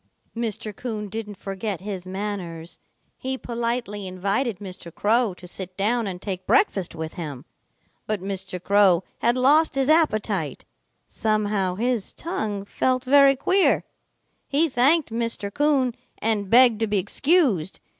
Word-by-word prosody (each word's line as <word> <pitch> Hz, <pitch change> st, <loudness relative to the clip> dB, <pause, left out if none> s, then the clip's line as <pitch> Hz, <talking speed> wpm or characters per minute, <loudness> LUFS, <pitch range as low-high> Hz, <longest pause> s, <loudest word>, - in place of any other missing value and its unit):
Mr. 220 Hz, -2 st, -4 dB
Coon 215 Hz, -4 st, -5 dB
didn't 210 Hz, -1 st, -6 dB
forget 195 Hz, -1 st, -4 dB
his 190 Hz, -2 st, -6 dB
manners. 185 Hz, -4 st, -5 dB, 0.4 s
He 265 Hz, 0 st, -2 dB
politely 235 Hz, -5 st, -3 dB
invited 200 Hz, +5 st, -1 dB
Mr. 185 Hz, -3 st, -9 dB
Crow 220 Hz, +2 st, +1 dB
to 180 Hz, 0 st, -12 dB
sit 185 Hz, 0 st, -7 dB
down 220 Hz, +3 st, +1 dB
and 180 Hz, -2 st, -5 dB
take 185 Hz, -1 st, -5 dB
breakfast 210 Hz, -, +2 dB
with 160 Hz, -1 st, -5 dB
him. 150 Hz, -6 st, -7 dB, 0.6 s
But 215 Hz, -1 st, -1 dB
Mr. 190 Hz, -1 st, -5 dB
Crow 190 Hz, -2 st, +4 dB, 0.2 s
had 235 Hz, +2 st, +2 dB
lost 290 Hz, +4 st, +4 dB
his 270 Hz, +1 st, +1 dB
appetite. 215 Hz, -, +1 dB, 0.4 s
Somehow 210 Hz, -4 st, 0 dB
his 235 Hz, -1 st, -1 dB
tongue 215 Hz, -, -4 dB
felt 255 Hz, +4 st, 0 dB
very 275 Hz, +1 st, +6 dB
queer. 375 Hz, +8 st, +2 dB, 0.6 s
He 300 Hz, +4 st, +3 dB
thanked 275 Hz, +1 st, +3 dB
Mr. 230 Hz, -3 st, -3 dB
Coon 285 Hz, -4 st, +2 dB, 0.2 s
and 210 Hz, -3 st, -1 dB
begged 240 Hz, -1 st, +6 dB
to 225 Hz, -, 0 dB
be 205 Hz, 0 st, 0 dB
excused. 205 Hz, -, +1 dB
210 Hz, 135 wpm, -24 LUFS, 190-250 Hz, 0.6 s, very